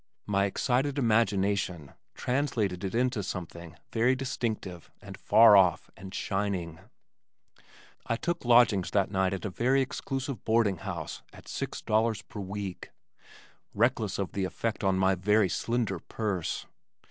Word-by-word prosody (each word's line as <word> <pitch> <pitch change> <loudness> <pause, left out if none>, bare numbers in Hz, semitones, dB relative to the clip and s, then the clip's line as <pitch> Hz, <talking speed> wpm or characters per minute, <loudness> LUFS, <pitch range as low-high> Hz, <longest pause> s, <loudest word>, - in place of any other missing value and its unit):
My 100 -1 +1
excited 130 +7 0
imagination 100 - +1 0.2
translated 120 -9 -1
it 95 +2 -3
into 125 -2 +1
something 85 -3 -7 0.2
very 120 +3 +3
distinctive 115 -9 -4
and - - -10
far 115 -2 +6
off 90 -3 +3
and 95 -1 -10
shining. 95 -5 -2 1.3
I 115 - +1
took 170 +8 -3
lodgings 120 -6 +4
that 100 -2 +1
night 95 -1 +1
at 95 +1 -4
a 105 - -3
very 130 +8 +2
exclusive 135 -2 -3
boarding 110 -4 +2
house - - -6
at - - -15
six - - -5
dollars 110 -1 +1
per 105 - -9
week, 100 -1 -6 0.9
reckless 110 -2 +1
of 100 -2 -3
the 100 - -2
effect 110 +4 -3
on 95 -1 +2
my 95 0 +3
very 100 +2 +2
slender 110 0 -1
purse. 100 -6 -3
105 Hz, 135 wpm, -29 LUFS, 95-120 Hz, 1.3 s, far